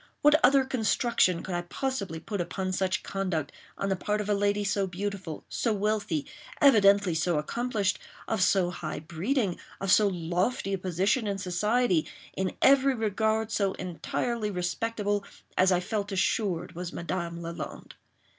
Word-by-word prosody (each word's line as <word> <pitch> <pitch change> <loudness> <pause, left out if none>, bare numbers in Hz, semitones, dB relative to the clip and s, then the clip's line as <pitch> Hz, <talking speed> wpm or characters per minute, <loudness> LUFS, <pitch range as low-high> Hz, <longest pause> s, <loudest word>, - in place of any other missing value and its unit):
What 295 +1 +5
other 265 +1 +6
construction 230 -7 +1
could 190 - -5
I 175 - 0
possibly 195 -3 -3
put 200 +3 -3
upon 185 +2 -3
such 185 0 0
conduct, 180 -7 -2 0.3
on 195 - -1
the 190 - +2
part 210 +3 -1
of 210 - -3
a - - +4
lady 205 0 +1
so 200 -1 0
beautiful—so 195 +3 -3
wealthy—evidently 205 - +2
so 165 0 +1
accomplished—of 215 +2 -2
so 180 -1 +3
high 155 -4 -5
breeding—of 190 - -2
so 210 +1 +6
lofty 185 +4 -1
a 195 - -1
position 190 +6 +1
in 200 -1 -1
society—in 190 -1 0
every 275 0 +5
regard 220 0 0
so 200 -3 +1
entirely 210 +5 -3
respectable 205 +2 -1 0.3
as 185 +1 +4
I 180 - +4
felt 205 +2 -3
assured 190 -3 0
was 175 0 -5
Madame 170 -1 -4
Lalande? 170 0 -7
195 Hz, 135 wpm, -28 LUFS, 180-215 Hz, 0.3 s, other